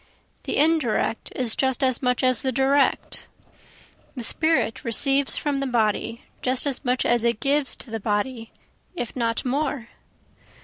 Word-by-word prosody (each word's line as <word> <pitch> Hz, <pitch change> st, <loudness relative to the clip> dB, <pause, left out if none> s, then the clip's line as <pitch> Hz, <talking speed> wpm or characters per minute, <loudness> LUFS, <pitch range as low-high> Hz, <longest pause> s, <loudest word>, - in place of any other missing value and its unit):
The -, -, -1 dB
indirect 290 Hz, -8 st, +1 dB
is 245 Hz, -4 st, +1 dB
just 265 Hz, 0 st, 0 dB
as 260 Hz, -2 st, +2 dB
much 250 Hz, 0 st, 0 dB
as 255 Hz, -1 st, +3 dB
the 260 Hz, -, 0 dB
direct, 270 Hz, +2 st, +1 dB, 0.9 s
The 250 Hz, -, -5 dB
spirit 315 Hz, -2 st, +1 dB
receives 275 Hz, +4 st, +2 dB
from 290 Hz, -2 st, -1 dB
the 275 Hz, -, -1 dB
body 230 Hz, -1 st, 0 dB, 0.2 s
just 255 Hz, +1 st, +1 dB
as 280 Hz, -2 st, -1 dB
much 250 Hz, -1 st, 0 dB
as 240 Hz, -1 st, +2 dB
it 235 Hz, -2 st, +1 dB
gives 280 Hz, 0 st, +1 dB
to 230 Hz, -, -11 dB
the 225 Hz, -, -3 dB
body, 225 Hz, +3 st, -2 dB, 0.5 s
if 245 Hz, -9 st, -5 dB
not 230 Hz, -1 st, -1 dB
more. 270 Hz, -2 st, -2 dB
255 Hz, 150 wpm, -24 LUFS, 230-275 Hz, 0.9 s, as